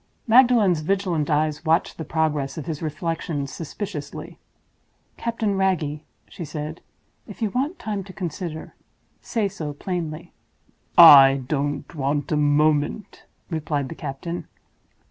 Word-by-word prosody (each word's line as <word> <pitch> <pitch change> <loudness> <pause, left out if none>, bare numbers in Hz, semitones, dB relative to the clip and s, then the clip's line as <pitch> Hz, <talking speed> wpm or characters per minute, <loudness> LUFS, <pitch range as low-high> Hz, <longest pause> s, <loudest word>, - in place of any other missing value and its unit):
Magdalen's 230 -7 +5
vigilant 175 -2 -1
eyes 150 0 0
watched 165 +1 +1
the - - -3
progress 150 -3 -1
of 155 - -5
his 160 -3 -5
reflections 160 -2 -3
suspiciously. 160 -3 -7 0.8
"Captain 230 -3 -2
Wragge," 165 -6 0 0.3
she 175 - -8
said, 155 +1 -6 0.5
"if - - -11
you 220 -4 -1
want 280 - -1
time 210 - -4
to 195 - -10
consider, 170 -3 -6 0.5
say 220 -4 -1
so 155 -6 -6
plainly." 160 -1 -5 0.6
"I 135 -1 +9
don't 145 +2 -2
want 145 0 -2
a - - +2
moment," 150 +6 +1 0.3
replied 150 -4 -2
the - - -5
captain. 170 +6 -6
160 Hz, 125 wpm, -23 LUFS, 145-190 Hz, 0.8 s, I